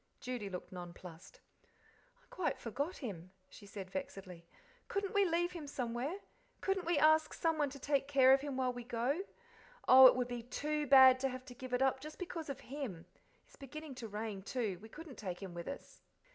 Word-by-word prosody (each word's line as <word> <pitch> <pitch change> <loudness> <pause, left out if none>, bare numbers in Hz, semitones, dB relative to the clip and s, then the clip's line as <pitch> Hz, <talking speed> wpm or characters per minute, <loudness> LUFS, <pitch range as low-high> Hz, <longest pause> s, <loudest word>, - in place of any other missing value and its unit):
Judy 245 -5 -4
looked 180 -1 -7
nonplussed. 175 -1 -10 0.2
"I - - -32
quite 370 - -1
forgot 285 - -3
him," 185 - -7 0.2
she 205 - -13
said, 195 -2 -8
vexedly. 195 -11 -7 0.4
"Couldn't 395 -1 -2
we 405 -1 +4
leave 345 0 +1
him 330 -5 -7
somewhere? 255 +5 -3 0.4
Couldn't 385 -3 -1
we 345 -2 +2
ask 315 0 +4
someone 315 -3 +1
to 280 - -9
take 280 0 0
care 265 -2 +6
of 270 - +4
him 280 -2 -4
while 255 -1 +1
we 245 0 -7
go? 245 +8 -1 0.7
Oh, 260 0 +11
it - - +5
would 250 -1 0
be 245 -1 -4
TOO 295 +5 -2
bad 260 -1 +8
to 270 +1 0
have 255 0 -7
to 255 - -10
give 255 +1 -9
it 250 +1 +2
up 265 0 +2
just 305 +3 -9
because 335 -4 -5
of 275 - -5
him. 245 - -6 0.4
It's - - -20
beginning 300 +2 -8
to 225 - -5
rain, 210 -1 -5
too; 200 -3 -3
we 220 - -11
couldn't 305 +1 -10
take 185 -4 -5
him 190 -3 -7
with 170 0 -7
us." 280 - -8
260 Hz, 200 wpm, -35 LUFS, 220-300 Hz, 0.7 s, Oh